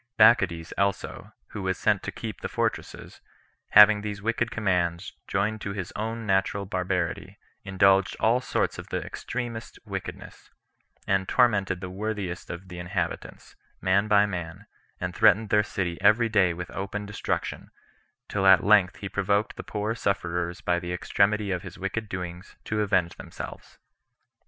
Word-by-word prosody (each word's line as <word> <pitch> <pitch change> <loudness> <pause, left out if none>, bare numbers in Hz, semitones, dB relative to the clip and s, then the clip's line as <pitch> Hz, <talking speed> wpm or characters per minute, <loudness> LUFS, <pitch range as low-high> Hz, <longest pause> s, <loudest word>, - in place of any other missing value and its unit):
Bacchides 110 -7 +4
also, 100 0 -2 0.2
who 105 - -6
was 95 0 -1
sent - - +2
to - - -5
keep - - -7
the - - -4
fortresses, - - -3 0.5
having 105 0 +8
these 105 -1 -5
wicked 115 +2 -1
commands, 95 -4 -1
joined 105 +2 -1
to 100 - -4
his 95 -3 -5
own 115 +1 -3
natural 100 0 +1
barbarity, 90 -3 -2 0.3
indulged 95 0 +3
all 115 +4 +3
sorts - - -1
of - - -9
the - - -3
extremest 120 -2 -5
wickedness, - - -7 0.6
and 95 -1 0
tormented 100 -7 +2
the 95 - -5
worthiest 100 -2 -4
of 85 +2 -7
the 90 0 -8
inhabitants, 90 0 -4 0.2
man 95 +3 +2
by 105 -1 +5
man, 90 0 -6 0.3
and - - -4
threatened 110 +2 +4
their 105 - +4
city 90 -4 -3
every 115 +2 +4
day 100 -5 +3
with 90 +1 -6
open 100 +2 -4
destruction, 100 -1 -3 0.6
till 95 -2 0
at 95 -2 +7
length 100 -3 +5
he 100 - -6
provoked 100 +2 0
the - - -6
poor 105 +1 -3
sufferers 90 -5 -2
by 85 0 +1
the 90 0 -5
extremity 100 +3 +1
of 90 -2 -1
his 90 -2 -10
wicked 100 +3 -4
doings 90 -1 -6
to 105 0 -1
avenge 95 -4 +1
themselves. - - -9
100 Hz, 155 wpm, -26 LUFS, 90-105 Hz, 0.6 s, having